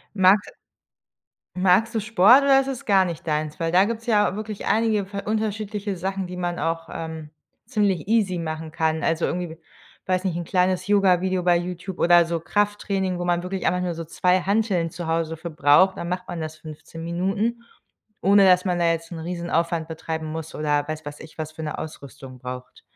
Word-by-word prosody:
Mags 195 +1 +5 1.1
magst 190 +5 +3
du 220 - +1
Sport 225 +5 +6
oder 270 -1 +5
ist 270 - -3
das 265 -3 -5
gar 195 -3 +5
nicht 170 -2 -6
deins? 155 +2 -2
Weil 165 0 0
da 185 +2 +6
gibt 225 +1 -3
es 230 - -18
ja 205 -4 +3
wirklich 215 -1 -6
einige 220 -2 +2
v 200 +1 -7
unterschiedliche 210 -2 -2
Sachen, 190 +1 -3
die 180 0 -7
man 175 -1 -3
auch 165 0 -2
ähm, 160 -2 -6 0.4
ziemlich 205 - 0
easy 205 -6 +2
machen 160 -1 -5
kann. 160 -1 0
Also 165 +1 +1
irgendwie, 175 -2 -4 0.5
weiß 185 0 0
nicht, 180 -3 -1
'n 175 - -3
kleines 185 +1 +1
Yoga 195 -3 +4
Video 185 -1 -1
bei 175 -1 +4
YouTube 180 +1 -6
oder 175 0 +6
so 165 0 -2
Krafttraining, 195 0 -1
wo 175 - -3
man 175 0 +1
wirklich 185 0 -3
einfach 180 0 +1
nur 180 -1 -2
so 165 0 -6
2 180 +3 +1
Hanteln 195 -3 0
zu 170 +1 -6
Hause 165 0 -1
für 170 +2 -7
braucht. 155 +5 +4
Dann 170 - -4
macht 180 +1 -4
man 170 - -5
das 155 0 -5
15 155 +1 -10
Minuten, 195 +7 -1 0.6
ohne 200 0 +6
dass 180 -1 +5
man 180 -2 0
da 170 - +2
jetzt 165 +1 -3
'n 170 - -6
Riesenaufwand 170 -1 -2
betreiben 160 0 -5
muss 160 0 -6
oder, 150 -1 0
weiß 155 0 -5
weiß 145 0 -8
ich, 155 - -12
was 155 0 -5
für 160 - -8
'ne 150 -1 -4
Ausrüstung 140 -4 -9
braucht. 125 0 -8
175 Hz, 200 wpm, -23 LUFS, 160-195 Hz, 1.1 s, Sport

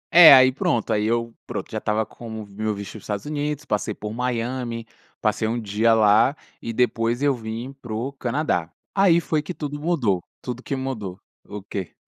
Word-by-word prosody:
É, 170 -2 +12
aí 130 -1 +8
pronto, 120 -3 0
aí 105 0 +1
eu 115 0 0
pronto, - - -5
já - - -2
estava 110 +1 0
como 110 -2 -8
meu 105 +2 -3
visto 100 0 -7
dos 110 - -9
Estados 105 -2 -4
Unidos, 150 0 -3
passei 105 -3 -1
por 105 0 -6
Miami, 120 -1 -2 0.3
passei 110 0 0
1 115 +2 -1
dia 110 +1 +2
lá, 110 +5 +5 0.3
e 115 - -4
depois 120 +1 +1
eu 145 -1 +4
vim 115 +2 -6
pro 120 +4 -4
Canadá. 125 - -1 0.2
Aí 190 -4 +5
foi 155 -2 0
que 170 +4 -7
tudo 145 -1 -5
mudou, 130 - +1 0.2
tudo 125 0 -6
que 140 - -3
mudou. 110 -8 -4 0.3
O 105 -1 -7
quê? 95 -2 -5
115 Hz, 185 wpm, -23 LUFS, 110-135 Hz, 0.3 s, É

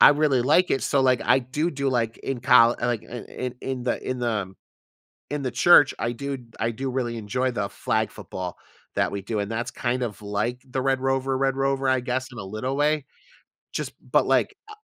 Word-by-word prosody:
I - - +10
really 145 -4 +2
like 155 +7 +4
it, 135 - +1
so 140 - +2
like 130 -2 +3
I 135 - +4
do 145 +7 -1
do 140 -2 -1
like 115 -3 0
in 135 -2 -3
coll 120 -2 +6
like, 120 -2 0
in 120 -1 -8
in 125 -1 -5
in 130 -2 -4
the 120 - -2
in 130 -1 -2
the, 120 -1 +1
um, 95 -3 -3 0.8
in 145 -1 -2
the 130 - -1
church, 145 +3 +6
I 115 - 0
do 140 +3 -4 0.2
I 115 - +1
do 130 +4 -4
really 120 -2 -2
enjoy 125 +5 -1
the 105 -4 -2
flag 110 0 -1
football 95 -4 -6 0.4
that - - +1
we 100 -1 -3
do, 110 +1 -2
and 100 +1 -2
that's 120 +3 -3
kind 125 +1 -1
of 110 -3 -5
like 105 +5 -2
the 130 +1 -1
Red 135 0 +1
Rover 135 0 0
Red 135 0 +1
Rover, 135 0 +1
I 130 -1 +2
guess, 130 +1 -2
in 120 - -11
a - - -5
little 110 +7 -3
way. 150 -1 +2 0.7
Just - - -3 0.2
but - - +4
like, 415 - +2
I - - -9
125 Hz, 220 wpm, -25 LUFS, 115-135 Hz, 0.8 s, I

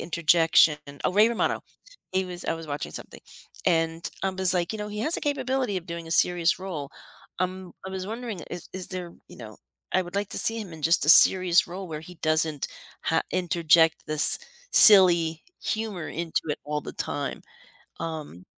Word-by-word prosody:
interjection. 165 -1 +3 0.3
Oh, - - +1
Ray 210 +3 +5
Romano, 235 - -1 0.5
he 190 0 0
was 180 -1 -8
I - - -1
was 165 0 -9
watching 145 -1 -5
something, - - -10 0.5
and 165 -1 0 0.2
I 195 - +1
was, 190 -1 0
like, 175 +1 -1
"You 220 - -5
know, 210 - -5
he 210 0 -7
has 310 +9 0
the - - -3
capability 260 -6 -1
of 170 - -15
doing 170 -1 -7
a - - -10
serious 175 0 +2
role." 165 -7 -6 0.5
Um, 185 0 -3 0.2
I - - -6
was 190 -1 -5
wondering, 225 -3 -6
is 175 - -8
is 185 -1 -7
there 180 -2 -6 0.2
you - - -14
know, 110 -3 -11 0.4
I 185 - +2
would 175 +1 -11
like 205 0 -1
to - - -4
see 225 0 +1
him 195 -5 -9
in 160 -1 -11
just 165 -1 +3
a - - -3
serious 180 +2 +7
role 185 +2 -7
where 155 -1 -6
he 180 +3 -13
doesn't 155 -2 0 0.4
ha - - +1
interject 170 -2 +2
this 155 -1 +1 0.3
silly 170 -6 +7 0.2
humor 215 -7 -3
into 165 -1 -3
it 150 - -2
all 150 0 -3
the - - -9
time, - - -4 0.6
um 155 - -7
175 Hz, 190 wpm, -25 LUFS, 160-190 Hz, 0.6 s, serious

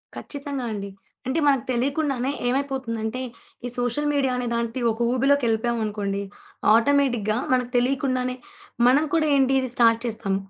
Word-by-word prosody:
ఖచ్చితంగా 280 -3 -5
అండి. 200 -2 -5 0.4
అంటే 270 +5 0
మనకి 270 -4 +3
తెలియకుండానే 270 +1 0 0.2
ఏమైపోతుందంటే, 255 -3 -2 0.4
ఈ - - -1
సోషల్ 245 +5 0
మీడియా 275 -2 +1
అనే 250 -1 -2
లాంటి 235 +1 -2
ఒక 225 - -7
ఊబిలోకెళ్ళిపోయామనుకోండి, 225 -6 0 0.5
ఆటోమేటిక్‌గా 235 -3 +2
మనకి 250 -1 +1
తెలియకుండానే 255 0 0 0.5
మనం 270 +5 +5
కూడా 320 -2 +3
ఏంటి 270 -1 +3
ఇది 260 -1 -2
స్టార్ట్ 230 -1 +4
చేస్తాం. 220 -4 -2
250 Hz, 125 wpm, -24 LUFS, 230-275 Hz, 0.5 s, మనం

